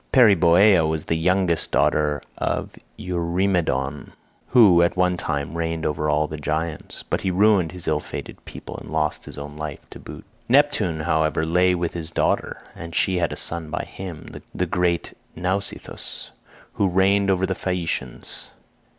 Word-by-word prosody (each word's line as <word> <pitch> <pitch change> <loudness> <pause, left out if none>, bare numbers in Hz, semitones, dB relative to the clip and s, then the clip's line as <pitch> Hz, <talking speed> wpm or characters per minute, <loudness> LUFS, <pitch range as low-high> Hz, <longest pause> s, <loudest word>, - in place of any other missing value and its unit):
Periboea 100 -5 +6
was 80 -1 -2
the 80 - 0
youngest 90 +1 +1
daughter 75 -1 +1
of - - -2 0.3
Eurymedon, 85 -4 -1 0.3
who 105 -9 +6
at 85 +1 +1
one 90 0 +2
time 70 -2 -3
reigned 80 0 -2
over 75 0 -1 0.2
the 75 0 -6
giants, 80 +2 -3
but - - -1
he 95 - -1
ruined 95 -3 +3
his 90 -2 -8
ill 75 -1 +2
fated - - -8
people - - -9
and - - -10
lost 75 -1 -1
his - - -9
own 75 0 -7
life 75 -1 -6
to - - -10
boot. - - -10 0.2
"Neptune, 115 - +3
however, 80 0 +1
lay 90 +2 +3
with 85 -1 -2
his 80 -2 -2
daughter, 80 - -1
and 85 0 -8
she 95 0 +2
had 85 - 0
a - - -4
son 85 -2 +1
by - - -3
him, 90 -5 -9
the - - 0
great 90 -1 -1 0.2
Nausithous, 95 +3 -3 0.4
who 100 - +1
reigned 100 +2 +3
over 95 -1 +2
the 95 - -1
Phaeacians. 85 -9 -4
85 Hz, 160 wpm, -23 LUFS, 80-95 Hz, 0.4 s, Periboea